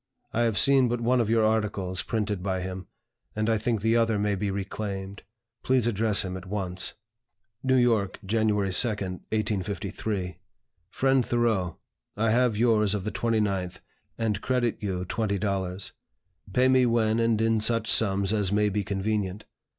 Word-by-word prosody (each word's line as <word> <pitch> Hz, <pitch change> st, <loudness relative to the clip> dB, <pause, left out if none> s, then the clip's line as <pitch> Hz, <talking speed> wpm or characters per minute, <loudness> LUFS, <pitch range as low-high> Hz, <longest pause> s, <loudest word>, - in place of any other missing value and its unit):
I 115 Hz, -, +1 dB
have 115 Hz, -3 st, +1 dB
seen 135 Hz, -2 st, +5 dB
but 120 Hz, 0 st, -1 dB
one 120 Hz, +1 st, +2 dB
of 110 Hz, -, -1 dB
your 115 Hz, -1 st, +3 dB
articles 100 Hz, -4 st, 0 dB
printed 105 Hz, -4 st, -2 dB
by 95 Hz, -1 st, -2 dB
him, 95 Hz, 0 st, -6 dB, 0.5 s
and 110 Hz, 0 st, -1 dB
I 110 Hz, -1 st, +2 dB
think 115 Hz, -1 st, -1 dB
the 115 Hz, +2 st, +2 dB
other 115 Hz, -2 st, +2 dB
may 105 Hz, 0 st, 0 dB
be 100 Hz, +1 st, -2 dB
reclaimed. 100 Hz, 0 st, -5 dB, 0.4 s
Please 130 Hz, -3 st, +2 dB
address 110 Hz, -2 st, +2 dB
him 90 Hz, 0 st, -4 dB
at 95 Hz, 0 st, -8 dB
once." 95 Hz, -2 st, -2 dB, 0.7 s
"NEW 130 Hz, 0 st, +2 dB
YORK, 115 Hz, -6 st, +2 dB
January 105 Hz, -2 st, +1 dB
2, 120 Hz, -, +5 dB
1853. 100 Hz, -1 st, -3 dB, 0.5 s
"FRIEND 135 Hz, +3 st, +2 dB
THOREAU, 110 Hz, -8 st, 0 dB, 0.4 s
I 110 Hz, +1 st, +2 dB
have 120 Hz, -2 st, +2 dB
yours 105 Hz, -3 st, +3 dB
of 100 Hz, -, -3 dB
the 105 Hz, -, -3 dB
29th, 100 Hz, -6 st, -1 dB, 0.4 s
and 105 Hz, -3 st, -1 dB
credit 125 Hz, -3 st, 0 dB
you 95 Hz, -3 st, -3 dB
$20. 100 Hz, -2 st, -2 dB, 0.6 s
Pay 125 Hz, +6 st, +3 dB
me 130 Hz, -1 st, +4 dB
when 115 Hz, -1 st, +2 dB
and 115 Hz, -2 st, +2 dB
in 115 Hz, 0 st, +2 dB
such 115 Hz, +1 st, 0 dB
sums 100 Hz, -2 st, +2 dB
as 100 Hz, -3 st, +1 dB
may 105 Hz, 0 st, +2 dB
be 105 Hz, +1 st, -1 dB
convenient. 100 Hz, -1 st, -2 dB
105 Hz, 160 wpm, -26 LUFS, 95-115 Hz, 0.7 s, seen